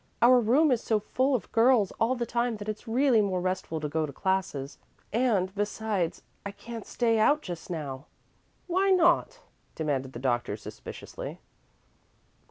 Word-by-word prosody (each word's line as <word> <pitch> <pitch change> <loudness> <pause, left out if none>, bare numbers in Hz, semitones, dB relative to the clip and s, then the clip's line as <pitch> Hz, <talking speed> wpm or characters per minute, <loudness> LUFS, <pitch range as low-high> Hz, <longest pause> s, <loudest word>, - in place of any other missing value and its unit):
"Our 250 +1 +7
room 265 +7 +4
is 240 -3 +2
so 220 -2 +1
full 260 +6 +1
of 240 - -4
girls 230 -4 +4
all 235 +3 +2
the 240 -1 -2
time 235 0 -1
that 205 0 -8
it's 215 +2 -5
really 245 0 +3
more 190 -3 0
restful 185 -3 -2
to 150 - -1
go 155 +1 -1
to - - -7
classes; 150 -5 -2 0.3
and, 210 -6 +1
besides, 205 -3 -2 0.2
I 200 - -4
can't 225 +2 -9
stay 230 -2 +1
out 290 +7 +3
just 175 -2 -7
now." 145 -5 -5 0.6
"Why 375 +2 +1
not?" 360 +6 +3 0.3
demanded 135 -4 -2
the - - -6
doctor, 120 -4 -1
suspiciously. 105 - -8
215 Hz, 160 wpm, -28 LUFS, 170-245 Hz, 0.6 s, Our